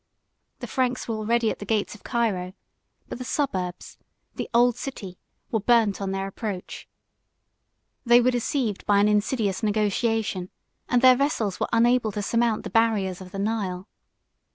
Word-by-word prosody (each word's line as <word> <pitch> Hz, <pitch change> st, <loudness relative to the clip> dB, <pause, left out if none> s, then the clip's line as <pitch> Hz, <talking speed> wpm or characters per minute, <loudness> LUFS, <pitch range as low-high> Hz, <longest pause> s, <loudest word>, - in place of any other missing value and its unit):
The -, -, -4 dB
Franks 255 Hz, -2 st, -1 dB
were 230 Hz, -, -2 dB
already 225 Hz, +1 st, +1 dB
at -, -, -7 dB
the -, -, -6 dB
gates 210 Hz, 0 st, 0 dB
of 210 Hz, -, -15 dB
Cairo; 205 Hz, -7 st, -1 dB, 0.5 s
but -, -, -7 dB
the -, -, -4 dB
suburbs, 190 Hz, -10 st, -3 dB, 0.3 s
the -, -, -5 dB
old 240 Hz, 0 st, +4 dB
city, 200 Hz, -9 st, -7 dB, 0.3 s
were 225 Hz, -, +1 dB
burnt 220 Hz, -3 st, +2 dB
on 195 Hz, -, -2 dB
their 195 Hz, 0 st, -2 dB
approach; 195 Hz, -1 st, -6 dB, 1.2 s
they 240 Hz, 0 st, +6 dB
were 250 Hz, +1 st, +3 dB
deceived 240 Hz, -3 st, -1 dB
by 205 Hz, -1 st, +4 dB
an 205 Hz, +1 st, +4 dB
insidious 210 Hz, -1 st, 0 dB
negotiation, 215 Hz, -2 st, 0 dB, 0.4 s
and 245 Hz, 0 st, +2 dB
their 255 Hz, 0 st, +8 dB
vessels 245 Hz, -, -1 dB
were -, -, -1 dB
unable 235 Hz, -1 st, +3 dB
to 205 Hz, -, -3 dB
surmount 230 Hz, 0 st, +1 dB
the -, -, -7 dB
barriers 205 Hz, -5 st, +1 dB
of 185 Hz, -, -9 dB
the 195 Hz, -, -7 dB
Nile. 195 Hz, -3 st, -2 dB
220 Hz, 160 wpm, -25 LUFS, 195-240 Hz, 1.2 s, their